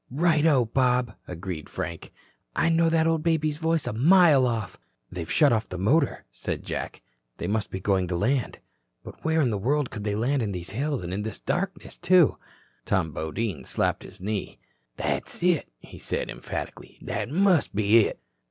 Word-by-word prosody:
"Righto, 150 -2 +3
Bob," 125 0 +1
agreed 90 -3 -6
Frank. 85 0 -6 0.4
"I'd 165 - +2
know 165 0 +4
the 165 -1 +2
old 165 -1 +2
baby's 155 -2 +1
voice 160 -1 0
a - - -2
mile 150 - +5
off." 115 -4 -3 0.3
"They've 85 -3 -5
shut 145 -5 +5
off 110 0 -1
the 90 - -5
motor," 135 - +1
said - - -5
Jack. - - -5 0.3
"They - - -5
must 105 0 -1
be 95 - -5
going 95 -1 +1
to 90 - -2
land. 120 +7 0 0.5
But - - -12
where 160 0 +2
in 125 -5 +2
the 105 - -1
world 140 +5 0
could 105 -2 -6
they 105 -1 -1
land 130 +5 +1
in 105 -3 -2
these 90 0 -6
hills 140 +2 -2
and 85 +1 -4
in 100 - -2
this 110 +1 -5
darkness, 190 +2 -3
too?" 180 -4 +4 0.5
Tom 95 -5 0
Bodine 80 - -3
slapped - - -1
his - - -13
knee. 100 +1 -4 0.4
"That's - - -2
it," 175 -4 +2
he - - -13
said - - -3
emphatically. - - -7
"That - - -3
must 180 - +2
be 110 +2 +5
it." - - -7
125 Hz, 180 wpm, -26 LUFS, 100-160 Hz, 0.5 s, mile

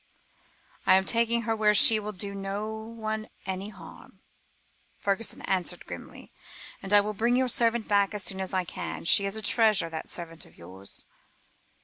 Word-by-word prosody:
"I - - +7
am 190 - +4
taking 235 +2 +2
her 225 0 0
where 210 -1 +3
she 220 +1 +7
will 210 0 -4
do 200 0 -5
no 200 +2 -4
one 220 -1 -5 0.2
any 190 +2 -4
harm," 210 - -14 0.8
Fergusson 205 +3 -2
answered 185 -2 -2
grimly, - - -10 0.5
"and 195 - -6
I 205 0 +7
will 210 +1 -3
bring 235 +4 +1
your 260 0 +2
servant 230 -1 +2
back 200 0 +2
as 205 - -2
soon 190 +1 -2
as 190 - -4
I 185 -2 0
can. 175 - -6
She 200 +4 +6
is 195 - -4
a 220 - -5
treasure, 215 -9 +3
that 160 -1 -5
servant 165 -2 -4
of - - -22
yours." 95 +3 -8
205 Hz, 175 wpm, -27 LUFS, 190-220 Hz, 0.8 s, I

